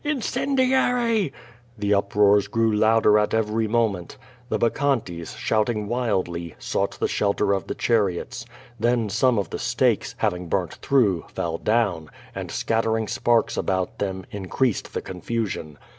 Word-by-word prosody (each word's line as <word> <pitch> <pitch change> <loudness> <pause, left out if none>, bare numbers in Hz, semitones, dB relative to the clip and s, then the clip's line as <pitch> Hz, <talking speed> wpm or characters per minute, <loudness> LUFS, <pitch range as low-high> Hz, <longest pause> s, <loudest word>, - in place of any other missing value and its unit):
incendiary!" 255 - +1 0.5
The 105 0 +1
up 100 0 0
roars 105 -1 +5
grew 115 -1 +1
louder 110 0 +4
at 105 +1 +1
every 110 0 0
moment. 105 -6 -1 0.3
The - - +1
bacchantes, 115 -9 -1
shout 110 +1 +1
ing 105 -3 -2
wildly, 95 -9 -2
sought - - -2
the - - +1
shelter 100 -1 +1
of 95 -4 -2
the - - -3
chariots. 100 -7 0 0.4
Then 120 -1 +1
some 115 +4 +2
of 100 -4 -2
the - - -4
stakes, - - +1
having 90 0 -1
burnt 90 -3 -1
through, 110 -11 +1
fell 85 -1 -2
down, 100 -9 0 0.2
and, - - -6
scattering 110 -1 0
sparks 120 -1 +1
about 95 -1 -1
them, 95 -2 -3
increased 105 +4 -1
the - - -1
confusion. 95 -5 -4
105 Hz, 145 wpm, -24 LUFS, 95-120 Hz, 0.5 s, roars